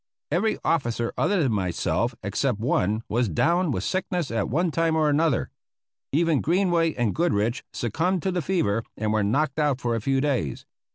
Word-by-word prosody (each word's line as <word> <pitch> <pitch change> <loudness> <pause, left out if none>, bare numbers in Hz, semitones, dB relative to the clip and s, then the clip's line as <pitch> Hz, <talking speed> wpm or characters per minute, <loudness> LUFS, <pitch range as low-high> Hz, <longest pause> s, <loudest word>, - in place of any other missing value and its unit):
Every 200 +8 +1
officer 120 -7 0
other 195 -4 +1
than 130 - +1
myself 105 +5 -1
except 105 +4 0
one 110 -1 0
was 120 0 0
down 170 - +2
with 95 -9 -1
sickness 180 - -2
at 115 -3 -1
one 170 +6 +1
time 165 0 +1
or 155 -1 +3
another. 150 -3 +1 0.6
Even 160 0 +2
Greenway 170 -2 +2
and 120 -4 0
Goodrich 120 -9 0
succumbed 165 - -1
to 190 - 0
the 180 -1 -1
fever 140 - 0
and 110 -1 -1
were 110 - +2
knocked 135 +8 0
out 145 -4 +1
for 120 -3 -1
a 115 - -2
few 135 +4 +1
days. 130 - -1
140 Hz, 175 wpm, -25 LUFS, 115-165 Hz, 0.6 s, or